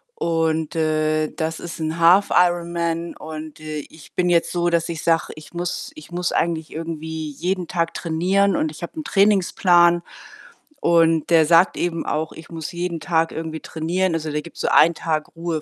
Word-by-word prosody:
Und, 160 - 0
äh, 155 -1 +1
das 160 0 -3
ist 170 0 -7
'n 160 +1 -2
Half-Ironman 170 -1 +2
und, 155 -1 -8
äh, 155 -1 -5
ich 160 - -16
bin 180 -1 +1
jetzt 170 -1 +2
so, 175 0 +1
dass 170 0 0
ich 165 -2 -4
sage: 165 -1 +1
„Ich 155 - -13
muss 175 - -4
ich 310 - -13
muss 175 0 -1
eigentlich 160 -2 -1
irgendwie 160 -1 -5
jeden 180 +4 -2
Tag 170 -2 -1
trainieren“ 185 +4 +1
und 155 - 0
ich 155 - -11
habe 170 - -6
'n 310 - -4
Trainingsplan 180 -5 +4 0.8
und 165 -2 +3
der 165 -2 +6
sagt 170 +4 +5
eben 170 -1 -2
auch: 155 +1 -2
„Ich 160 - -12
muss 165 -1 -6
jeden 175 -1 -3
Tag 165 0 +1
irgendwie 160 0 -5
trainieren“, 170 +3 -1
also, 155 -1 -3
der 150 - -2
gibt 170 - -13
so - - -2
1 170 +2 +6
Tag 155 0 -3
Ruhe 165 -2 -3
165 Hz, 180 wpm, -22 LUFS, 160-175 Hz, 0.8 s, der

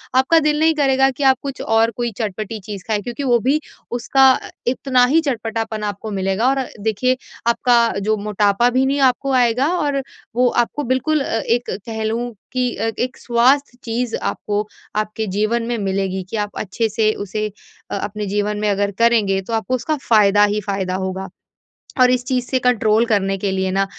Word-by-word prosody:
आपका 265 +6 +5
दिल 300 -1 +1
नहीं 320 0 +4
करेगा 270 -2 +3
कि 275 +3 -5
आप 265 -1 +5
कुछ 275 -2 -6
और 225 +1 +2
कोई 240 -1 -1
चटपटी 215 0 -4
चीज़ 200 -1 -8
खाएँ 210 -2 0
क्योंकि 245 +6 -5
वो 245 -3 +3
भी 270 +6 +1 0.4
उसका 270 +2 +4 0.4
इतना 255 0 +3
ही 325 - +5
चटपटापन 225 -2 -3
आपको 210 +1 -4
मिलेगा। 195 +4 0
और 270 0 +1 0.2
देखिए 225 +5 0 0.3
आपका 240 +1 +3 0.2
जो 215 +2 0
मोटापा 210 +2 +2
भी 255 +2 +2
नहीं 280 +1 0
आपको 275 +2 -5
आएगा 250 +1 +3
और 285 -4 0 0.3
वो 250 0 +4
आपको 240 +5 0
बिल्कुल 270 +4 +1
अ, 225 - -1
एक 240 +2 -1
कह 220 +3 -5
लूँ 235 +2 -2 0.2
कि 250 -1 +1
अ, 225 +2 -1
एक 250 +1 -2
स्वास्थ्य 250 +2 +2
चीज़ 235 0 -2
आपको 210 0 -2 0.3
आपके 215 +1 -2
जीवन 215 +4 0
में 240 0 -1
मिलेगी 195 -2 -1
कि 225 - -3
आप 205 - -7
अच्छे 220 +3 -1
से 215 0 +2
उसे 215 +2 -3 0.5
अ - - -1
अपने 210 +1 -4
जीवन 205 +1 -1
में 210 - 0
अगर 200 0 0
करेंगे 215 -5 +3
तो 210 +4 -7
आपको 225 +3 0
उसका 305 +5 -1
फ़ायदा 205 -2 +5
ही 210 - -1
फ़ायदा 190 -2 -2
होगा। 190 0 -4 0.7
और 250 - +7
इस 250 -1 +1
चीज़ 250 -1 -1
से 260 - +2
कंट्रोल 225 -2 +2
करने 195 -4 +1
के 195 +1 -2
लिए 190 0 -1
न 195 +1 +1
225 Hz, 190 wpm, -19 LUFS, 205-255 Hz, 0.7 s, और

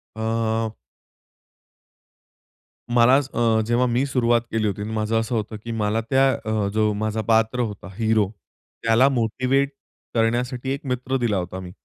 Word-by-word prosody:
अ. 110 0 -1 2.3
मलाच 130 +4 +5
अ, 115 -2 +3
जेव्हा 120 +2 +2
मी 125 +3 +1
सुरुवात 120 -3 +2
केली 110 -1 0
होती 100 0 -3
आणि 105 - -4
माझं 110 +1 0
असं 115 +2 -2
होतं 110 0 -3
की 115 - -5
मला 110 0 0
त्या 135 0 +4
अ, 110 -4 -1
जो 110 -1 +2
माझा 110 0 -1
पात्र 115 +2 +2
होता 105 -4 -3
हीरो. 110 -3 +2 0.5
त्याला 115 +4 +4
मोटिव्हेट 130 +2 +1 0.4
करण्यासाठी 125 +3 0
एक 140 - -7
मित्र 125 +1 -1
दिला 115 -5 0
होता, 90 +1 -4
मी. 90 -1 -8
115 Hz, 145 wpm, -23 LUFS, 110-125 Hz, 2.3 s, मलाच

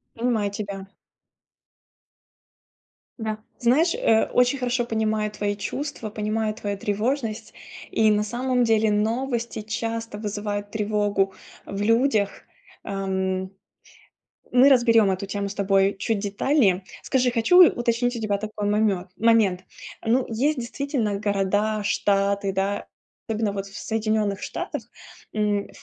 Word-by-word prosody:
Понимаю 225 -4 0
тебя. 200 -1 -6 2.3
Да, 215 -1 -3 0.2
знаешь, 275 +8 +3
э, 220 -1 +3
очень 250 +2 +3
хорошо 245 -1 0
понимаю 220 -2 0
твои 205 -1 -2
чувства, 250 +1 -4
понимаю 215 0 -1
твою 205 -2 -4
тревожность. 220 +2 -2 0.4
И, 220 -1 +3
на 210 0 +2
самом 250 +2 0
деле, 220 -1 +3
новости 230 +2 -1
часто 225 0 -4
вызывают 205 -1 -4
тревогу 205 -2 0 0.3
в 200 0 -5
людях. 225 -2 +3 0.5
Ам, 190 -1 -2 1.0
мы 255 +3 +7
разберем 230 -6 +5
эту 190 +1 -2
тему 200 +1 -3
с 200 - -7
тобой 195 0 +2
чуть 215 0 -1
детальнее. 200 -2 +1 0.2
Скажи, 250 -1 +1
хочу 340 +10 +7
уточнить 240 0 0
у - - -4
тебя 205 -2 0
такой 210 -1 -3
намёт 205 -3 +1
момент. 210 -5 +3 0.4
Ну, 245 +3 +3
есть, 265 +6 0
действительно, 240 -4 -2
города, 205 +2 +1
штаты, 200 -1 +1
да. 195 +1 -1 0.4
Особенно 215 -2 0
вот 200 0 -4
в 195 - -11
Соединенных 215 -2 -1
Штатах, - - -4 0.5
м, 210 -1 0
215 Hz, 120 wpm, -24 LUFS, 200-235 Hz, 2.3 s, мы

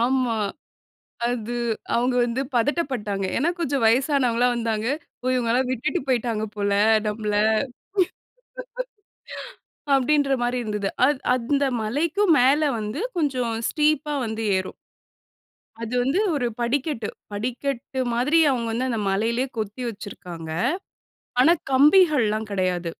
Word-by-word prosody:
ஆமா. 250 -1 +1 0.9
அது 240 -1 -3 0.4
அவுங்க 245 +2 +2
வந்து 240 +2 -2
பதட்டப்பட்டாங்க. 235 - 0
ஏன்னா 300 +7 +2
கொஞ்சம் 280 -5 0
வயசானவங்கள்லாம் 250 0 +3
வந்தாங்க. 225 -2 -1 0.4
போய் 255 +1 +1
இவுங்கல்லாம் 250 +1 +1
விட்டுட்டு 260 +2 -1
போயிட்டாங்க 235 -4 0
போல 200 0 0 0.3
நம்மள, 210 0 -2 2.6
அப்டின்றமாரி 270 -2 +2
இருந்தது. 210 -2 -2 0.2
அத் 285 -2 0
அந்த 275 +4 0 0.2
மலைக்கும் 320 - +2
மேல 275 +4 +4 0.2
வந்து 215 +7 -4 0.2
கொஞ்சம் 255 -7 0
ஸ்டீப்பா 300 -1 +1
வந்து 220 0 -4
ஏறும் 185 0 -4 1.1
அது 230 +1 -5
வந்து 280 +10 +1 0.2
ஒரு 250 -4 0
படிக்கட்டு. 245 -2 -1 0.2
படிக்கட்டு 250 +4 -3
மாதிரி 275 +8 +3
அவுங்க 235 -3 -1
வந்து 245 +3 -1
அந்த 230 -3 -1
மலையிலேயே 230 +6 0
கொத்தி 215 +4 -4
வச்சிருக்காங்க. 180 -6 -8 0.9
ஆனா 335 +6 +6 0.2
கம்பிகள்லாம் 270 - +4
கிடையாது. 180 -2 0
245 Hz, 105 wpm, -24 LUFS, 220-275 Hz, 2.6 s, ஆனா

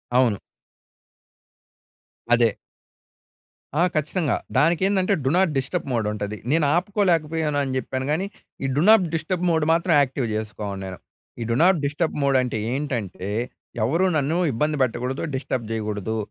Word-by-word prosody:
అవును. 125 -5 +4 2.0
అదే. 120 -1 +5 1.3
ఆ! - - +4
ఖచ్చితంగా. 155 -1 0 0.2
దానికేందంటే 185 +5 +3
డు 130 - +2
నాట్ 190 -3 +3
డిస్టర్బ్ 140 +6 -2
మోడ్ 115 -3 0
ఉంటది. 105 0 -4
నేను 155 0 +3
ఆపుకోలేకపోయానని 160 -7 +1
చెప్పాను 130 +1 -3
కానీ, 170 +6 0 0.4
ఈ - - +1
డు 145 - +2
నాట్ 220 -4 +7
డిస్టర్బ్ 170 +3 -2
మోడ్ 160 -2 +2
మాత్రం 170 +1 +2
యాక్టివ్ 130 -2 -1
చేసుకోన్నేను. 100 -3 -5 0.4
ఈ - - 0
డు 115 - +2
నాట్ 185 -1 +5
డిస్టర్బ్ 150 +3 -1
మోడ్ 135 -1 +3
అంటే 125 -3 -2 0.2
ఏంటంటే, 120 - -3 0.6
ఎవరూ 165 +10 +2
నన్ను 150 +3 0 0.2
ఇబ్బంది 150 +6 0
పెట్టకూడదు. 125 +2 -2
డిస్టర్బ్ 130 -3 -3
చేయకూడదు. 110 0 -2
140 Hz, 130 wpm, -23 LUFS, 115-165 Hz, 2.0 s, నాట్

